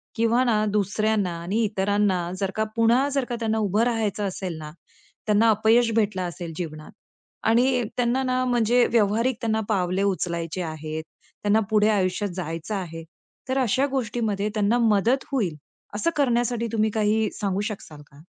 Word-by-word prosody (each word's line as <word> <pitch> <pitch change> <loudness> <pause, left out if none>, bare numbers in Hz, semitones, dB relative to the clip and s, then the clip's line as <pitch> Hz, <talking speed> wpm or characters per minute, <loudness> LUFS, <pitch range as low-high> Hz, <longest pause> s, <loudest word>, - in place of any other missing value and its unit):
किंवा 230 +2 +2
ना 215 -3 +2
दुसऱ्यांना 205 -2 0
आणि 200 +7 0
इतरांना 195 -3 0
जर 195 -1 -1
का 215 - +1
पुन्हा 235 +4 +3
जर 275 -2 0
का 240 - -4
त्यांना 220 -1 0
उभं 210 0 +1
राहायचं 220 -4 -1
असेल 185 -3 -5
ना, 150 -1 -8 0.5
त्यांना 215 +2 +4
अपयश 225 +2 +4
भेटलं 205 -4 +1
असेल 170 -1 -7
जीवनात 155 -3 -6 0.6
आणि 245 +1 +3
त्यांना 245 +2 +1
ना 255 0 0
म्हणजे 240 0 +3
व्यावहारिक 230 +3 +2
त्यांना 220 -1 0
पावले 185 -1 +1
उचलायचे 175 -3 -2
आहेत. 155 -1 -5 0.4
त्यांना 205 +2 +3
पुढे 215 0 +3
आयुष्यात 200 0 0
जायचं 165 +3 -4
आहे, 165 -4 -5 0.5
तर 260 - 0
अशा 260 +2 +2
गोष्टीमध्ये 220 -5 -1
त्यांना 215 +2 +2
मदत 230 +3 +2
होईल 200 - 0 0.4
असं 275 +11 +1
करण्यासाठी 240 -4 +1
तुम्ही 220 -1 +1
काही 215 0 +1
सांगू 200 -1 -1
शकशाल 155 -7 -9
का? 140 +2 -16
215 Hz, 155 wpm, -24 LUFS, 190-235 Hz, 0.6 s, त्यांना